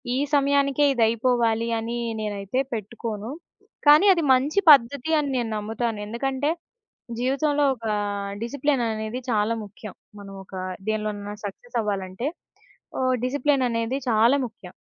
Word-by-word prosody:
ఈ -, -, 0 dB, 0.2 s
సమయానికే 280 Hz, 0 st, +3 dB
ఇది 235 Hz, -3 st, +2 dB
అయిపోవాలి 230 Hz, -1 st, +1 dB
అని 230 Hz, +1 st, -4 dB, 0.2 s
నేనైతే 210 Hz, +3 st, -3 dB
పెట్టుకోను. 220 Hz, 0 st, -5 dB, 0.6 s
కానీ 300 Hz, +6 st, +8 dB
అది 335 Hz, -3 st, -1 dB
మంచి 280 Hz, +9 st, +2 dB
పద్ధతి 280 Hz, +3 st, +4 dB
అని 285 Hz, -2 st, -1 dB
నేను 235 Hz, -2 st, -1 dB
నమ్ముతాను. 220 Hz, +1 st, -3 dB
ఎందుకంటే, 270 Hz, +5 st, -1 dB, 0.7 s
జీవితంలో 285 Hz, +3 st, +1 dB
ఒక 230 Hz, -2 st, -12 dB, 0.6 s
డిసిప్లిన్ 275 Hz, +1 st, 0 dB
అనేది 220 Hz, +3 st, -4 dB
చాలా 215 Hz, +1 st, +1 dB
ముఖ్యం. 205 Hz, 0 st, -10 dB, 0.3 s
మనమొక 195 Hz, -1 st, -11 dB, 0.4 s
దేనిలోనైనా 210 Hz, -1 st, -3 dB
సక్సెస్ 240 Hz, +5 st, -6 dB
అవ్వాలంటే, 200 Hz, +5 st, -3 dB, 0.7 s
ఓహ్, 255 Hz, 0 st, +2 dB
డిసిప్లిన్ 275 Hz, 0 st, +1 dB
అనేది 230 Hz, +3 st, -1 dB
చాలా 230 Hz, +5 st, +4 dB
ముఖ్యం. 205 Hz, -6 st, -14 dB
235 Hz, 120 wpm, -24 LUFS, 215-275 Hz, 0.7 s, కానీ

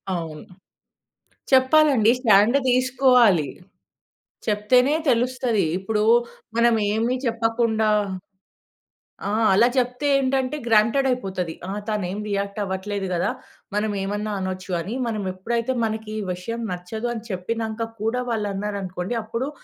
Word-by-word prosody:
అవును. 160 Hz, -3 st, -6 dB, 1.1 s
చెప్పాలండి. 260 Hz, -3 st, +5 dB
స్టాండ్ 225 Hz, +1 st, +5 dB
దీసుకోవాలి, 250 Hz, -, +4 dB, 1.0 s
చెప్తేనే 250 Hz, +7 st, +3 dB
తెలుస్తది. 245 Hz, -4 st, +1 dB
ఇప్పుడు 210 Hz, +2 st, -1 dB, 0.6 s
మనం 235 Hz, 0 st, +4 dB, 0.2 s
ఏమి 230 Hz, +3 st, +1 dB
చెప్పకుండా 225 Hz, -1 st, +1 dB, 1.4 s
ఆ! -, -, -1 dB, 0.2 s
అలా 225 Hz, +5 st, +5 dB
జెప్తే 250 Hz, +3 st, 0 dB
ఏంటంటే 265 Hz, +1 st, 0 dB
గ్రాంటెడైపోతది. 220 Hz, -6 st, +1 dB, 0.2 s
"ఆ! -, -, -3 dB, 0.2 s
తనేం 205 Hz, -2 st, -2 dB
రియాక్ట్ 200 Hz, +1 st, -2 dB
అవ్వట్లేదు 195 Hz, +1 st, -3 dB
గదా! 175 Hz, -, 0 dB, 0.4 s
మనం 210 Hz, +1 st, 0 dB
ఏమన్నా 205 Hz, +2 st, -3 dB
అనచ్చు" 185 Hz, 0 st, -5 dB
అని 205 Hz, +7 st, -5 dB
మనం 215 Hz, -3 st, -2 dB
ఎప్పుడైతే 235 Hz, +6 st, -2 dB
మనకి 220 Hz, -1 st, -3 dB
ఈ -, -, -3 dB
విషయం 230 Hz, +6 st, -5 dB
నచ్చదు 220 Hz, +7 st, -4 dB
అని 225 Hz, -2 st, -6 dB
చెప్పినంక 225 Hz, +4 st, -3 dB
కూడా 225 Hz, +3 st, 0 dB
వాళ్ళు 220 Hz, -3 st, -1 dB
అన్నారనుకోండి 195 Hz, 0 st, -4 dB
అప్పుడు 230 Hz, +5 st, -3 dB
220 Hz, 110 wpm, -23 LUFS, 200-245 Hz, 1.4 s, చెప్పాలండి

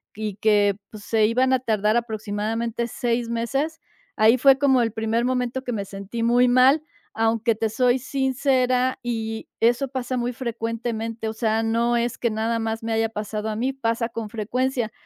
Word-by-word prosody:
y 210 Hz, -2 st, -4 dB
que, 205 Hz, -2 st, +3 dB
pues, 215 Hz, -2 st, -11 dB
se 215 Hz, +1 st, +2 dB
iban 255 Hz, +3 st, +2 dB
a 260 Hz, -, +3 dB
tardar 215 Hz, -3 st, +1 dB
aproximadamente 225 Hz, +1 st, -2 dB
seis 235 Hz, 0 st, -1 dB
meses, 275 Hz, +8 st, -2 dB, 0.4 s
ahí 225 Hz, +4 st, +5 dB
fue 270 Hz, +1 st, +6 dB
como 270 Hz, -3 st, +3 dB
el 225 Hz, -, 0 dB
primer 225 Hz, +2 st, 0 dB
momento 255 Hz, 0 st, -1 dB
que 245 Hz, -, -3 dB
me 200 Hz, -3 st, -3 dB
sentí 200 Hz, +4 st, -5 dB
muy 245 Hz, +2 st, +4 dB
mal, 255 Hz, +5 st, +5 dB, 0.3 s
aunque, 225 Hz, 0 st, +1 dB
te 225 Hz, 0 st, -1 dB
soy 250 Hz, +3 st, +2 dB
sincera, 260 Hz, -1 st, +1 dB
y 225 Hz, -2 st, -4 dB
eso 240 Hz, +4 st, +2 dB
pasa 255 Hz, -1 st, -3 dB
muy 245 Hz, 0 st, -1 dB
frecuentemente, 230 Hz, -1 st, -4 dB
o 220 Hz, -, -3 dB
sea, 220 Hz, 0 st, 0 dB
no 235 Hz, +1 st, +1 dB
es 235 Hz, +1 st, -1 dB
que 235 Hz, -, +1 dB
nada 225 Hz, +1 st, -1 dB
más 225 Hz, 0 st, -3 dB
me 225 Hz, 0 st, -2 dB
haya 225 Hz, 0 st, +1 dB
pasado 215 Hz, 0 st, -4 dB
a 215 Hz, -, -3 dB
mí, 255 Hz, +4 st, -1 dB
pasa 230 Hz, -2 st, -1 dB
con 225 Hz, -2 st, -5 dB
frecuencia. 235 Hz, +2 st, -1 dB
230 Hz, 180 wpm, -23 LUFS, 220-250 Hz, 0.4 s, fue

